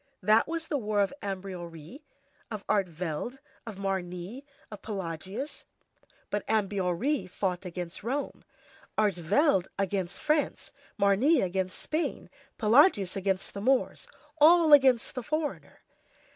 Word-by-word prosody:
That 215 +3 +4
was 330 0 -4
the 290 - -1
war 210 -2 -1
of 200 +3 +2
Ambiorix, 185 - -7 0.5
of 215 -2 -6
Artevelde, 180 - -2 0.3
of 220 - -6
Marnix, 190 +3 -4 0.3
of 210 - -9
Pelagius. 195 - -5 0.7
But 205 - -1
Ambiorix 200 - 0
fought 185 0 -2
against 175 0 -6
Rome, 270 +5 -3 0.5
Artevelde 195 - +2
against 195 -2 -2
France, 305 -1 0 0.3
Marnix 200 +11 +4
against 185 0 -2
Spain, 315 +2 -3 0.3
Pelagius 215 - +4
against 195 -1 -1
the 200 - -5
Moors; 260 +4 +1 0.3
all 320 0 +7
against 265 -4 +5
the 255 - -4
foreigner. 305 +4 -4
200 Hz, 115 wpm, -29 LUFS, 185-270 Hz, 0.7 s, all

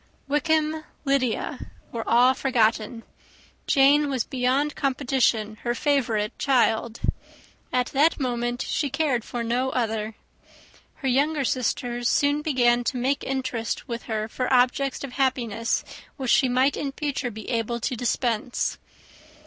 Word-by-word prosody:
Wickham, 310 +1 +1 0.2
Lydia, 270 -4 -1 0.2
were 230 -1 -3
all 245 +2 +5
forgotten. 230 -3 +1 0.6
Jane 285 +2 +5
was 260 -4 0
beyond 265 +3 0
competition 255 -5 0
her 240 +2 -2
favourite 230 -7 0
child. 235 -4 +2 0.7
At 250 0 +2
that 300 +5 +3
moment 240 -2 -1
she 290 - 0
cared 275 -4 0
for 240 0 -4
no 245 +3 0
other. 225 -3 -2 0.8
Her 275 - -4
younger 280 +3 +2
sisters 245 -1 -1
soon 290 +1 +2
began 245 -5 +2
to 255 - -1
make 270 +3 0
interest 255 -4 -3
with 235 -2 -4
her 215 -1 -1
for 250 +3 -3
objects 255 +2 +2
of 275 - -5
happiness 245 -4 0 0.3
which 260 -4 -1
she 260 - +4
might 260 +3 +3
in 275 -2 -3
future 280 -3 -2
be 220 -1 -9
able 235 0 -1
to 255 - -1
dispense. 240 0 -1
255 Hz, 135 wpm, -25 LUFS, 235-275 Hz, 0.8 s, all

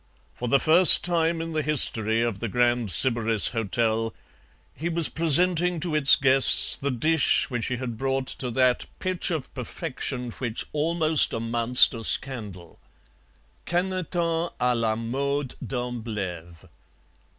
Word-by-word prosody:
For 125 - -7
the 140 +3 +2
first 165 +4 +6
time 165 -1 -1
in 165 0 -7
the 155 - -2
history 115 -6 +4
of 115 -4 -4
the 115 - -5
Grand 120 0 -1
Sybaris 115 - +2
Hotel, 115 0 -3 0.6
he 165 +3 -6
was 170 -2 0
presenting 175 +2 +1
to 160 0 -3
its 150 -2 +6
guests 135 0 +4
the 140 - -4
dish 150 +3 0
which 120 -2 -3
he 125 - -4
had 120 -3 -7
brought 135 0 -3
to 130 -1 -3
that 125 0 0
pitch 185 -1 -2
of 160 -6 -6
perfection 125 -1 -6
which 120 -1 -6
almost 155 0 0
amounts 115 +2 +3
to 115 -2 -9
scandal. 105 -11 -2 0.9
Canetons 175 -2 -3
à 125 0 0
la 115 -2 -2
mode 135 +4 -4
d'Amblève. 105 -10 -7
130 Hz, 135 wpm, -23 LUFS, 115-160 Hz, 0.9 s, first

